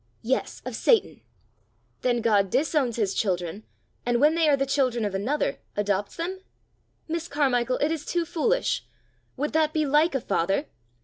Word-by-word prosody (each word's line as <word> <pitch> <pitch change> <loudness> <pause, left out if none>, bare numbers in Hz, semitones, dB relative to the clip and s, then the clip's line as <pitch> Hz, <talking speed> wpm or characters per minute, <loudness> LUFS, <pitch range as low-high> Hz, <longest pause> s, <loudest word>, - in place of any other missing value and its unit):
"Yes, 255 +4 -2
of - - -4
Satan." 450 -5 +2 0.8
"Then 240 -2 +1
God 205 -4 +3
disowns 275 - +1
his 205 -4 0
children, 180 -1 -1 0.4
and 240 0 +1
when 300 +3 +5
they 330 -2 +3
are 285 - +4
the 275 - +1
children 255 -5 +1
of 205 - -2
another, 235 +10 -1 0.2
adopts 205 -1 -1
them? 360 +3 -4 0.7
Miss 335 +1 -3
Carmichael, 255 -4 +1
it 295 +2 +1
is 320 -2 -2
too 345 +1 -1
foolish! 455 +11 0 0.5
Would 295 +4 -2
that 310 -1 +2
be 310 -1 +1
like 295 +2 +3
a 265 - 0
father? 195 - 0
275 Hz, 165 wpm, -26 LUFS, 220-310 Hz, 0.8 s, when